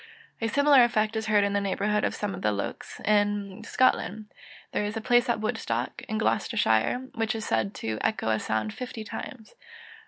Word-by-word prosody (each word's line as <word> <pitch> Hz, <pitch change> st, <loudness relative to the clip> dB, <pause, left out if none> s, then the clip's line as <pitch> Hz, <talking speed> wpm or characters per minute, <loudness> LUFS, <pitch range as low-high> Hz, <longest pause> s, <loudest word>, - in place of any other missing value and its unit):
A 225 Hz, -, +1 dB
similar 280 Hz, +2 st, +6 dB
effect 220 Hz, -2 st, +1 dB
is 220 Hz, 0 st, -2 dB
heard 210 Hz, -1 st, +4 dB
in 200 Hz, 0 st, 0 dB
the 200 Hz, -, +1 dB
neighbourhood 205 Hz, +2 st, 0 dB
of -, -, 0 dB
some 205 Hz, -1 st, -3 dB
of -, -, -7 dB
the 105 Hz, -, +2 dB
Lochs 100 Hz, -1 st, -5 dB
in 205 Hz, -1 st, +1 dB
Scotland. 220 Hz, -4 st, +1 dB, 0.4 s
There -, -, 0 dB
is 210 Hz, +2 st, -3 dB
a -, -, 0 dB
place 240 Hz, +2 st, +3 dB
at 235 Hz, -, +1 dB
Woodstock, 120 Hz, -, -2 dB
in 215 Hz, -, -1 dB
Gloucestershire, 225 Hz, -, +1 dB
which 225 Hz, -1 st, -1 dB
is 220 Hz, -, -4 dB
said 110 Hz, -3 st, 0 dB
to 110 Hz, -1 st, -3 dB
echo 220 Hz, -, 0 dB
a 110 Hz, -1 st, +2 dB
sound 110 Hz, -1 st, -2 dB
fifty 245 Hz, -3 st, -6 dB
times. 220 Hz, +1 st, -8 dB
210 Hz, 190 wpm, -27 LUFS, 195-225 Hz, 0.4 s, similar